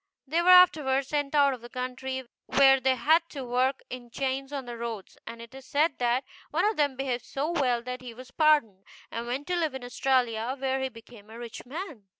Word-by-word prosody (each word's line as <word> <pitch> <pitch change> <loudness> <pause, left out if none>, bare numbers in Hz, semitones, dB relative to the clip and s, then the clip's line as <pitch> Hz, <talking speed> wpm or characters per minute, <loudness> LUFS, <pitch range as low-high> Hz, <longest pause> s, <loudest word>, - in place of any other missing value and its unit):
They 320 +5 +1
were 355 - +2
afterward 305 -7 +6
sent 290 +1 -2
out 280 -2 +5
of 250 - -8
the 240 - -11
country, 255 +1 -5 0.2
where 270 0 +6
they 260 0 +2
had 315 +6 +4
to 275 -3 -6
work 255 +2 +1
in 245 -1 -8
chains 270 +2 -3
on 275 -3 -4
the 240 -1 -6
roads; 230 -4 -6
and 230 0 -8
it 235 - -14
is 265 -1 -12
said 295 0 +1
that 245 +2 +1 0.3
one - - +1
of 430 +1 +2
them 285 -3 +1
behaved 255 -2 -2
so 290 +4 -2
well 250 -8 +1
that 250 +1 -5
he 250 -1 -8
was 255 +2 -12
pardoned, 290 - +3 0.3
and 230 +1 -4
went 260 +4 -3
to 360 - -1
live 320 -6 -1
at 265 - -6
Australia, 245 -1 0
where 265 0 -1
he 265 - -1
became 230 -3 -15
a 225 - -10
rich 235 0 -9
man. 300 - -7
260 Hz, 220 wpm, -28 LUFS, 240-285 Hz, 0.3 s, afterward